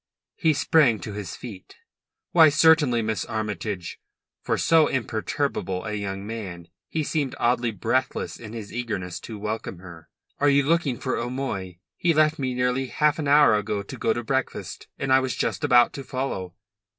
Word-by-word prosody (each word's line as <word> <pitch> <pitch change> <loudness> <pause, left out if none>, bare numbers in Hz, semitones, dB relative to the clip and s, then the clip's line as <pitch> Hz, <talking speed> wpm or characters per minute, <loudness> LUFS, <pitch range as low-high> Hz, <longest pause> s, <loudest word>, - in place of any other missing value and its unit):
He 160 -5 +2
sprang 140 -5 +4
to 105 - -6
his 100 -3 -6
feet. 105 -7 -10 0.6
"Why, 160 -3 +7
certainly, 145 -5 +4
Miss 110 -4 -1
Armytage." 105 -4 -4 0.4
For - - -1
so 160 -2 +4
imperturbable 110 -5 -2
a 105 - -3
young 100 -1 -4
man 95 -6 -7 0.2
he 160 - -1
seemed 145 -3 -1
oddly 120 0 +2
breathless 125 +5 -2
in 110 -2 -9
his 110 -3 -7
eagerness 95 -8 -4
to 110 +2 -8
welcome 105 -2 -4
her. 85 -3 -12 0.3
"Are 145 - +4
you 140 0 +4
looking 145 -4 +1
for 130 - -2
O'Moy? 115 -8 -4 0.2
He 165 -2 +2
left 155 0 +3
me 130 -2 -1
nearly 125 +1 0
half 150 +4 +1
an 150 - -2
hour 145 -3 +6
ago 105 -1 -1
to - - -8
go - - 0
to 120 - -2
breakfast, 130 +2 -3
and 135 -1 0
I 130 - +7
was 130 -1 -2
just - - -2
about 125 -4 +5
to 140 - -6
follow." 115 -10 -4
120 Hz, 175 wpm, -25 LUFS, 105-140 Hz, 0.6 s, Why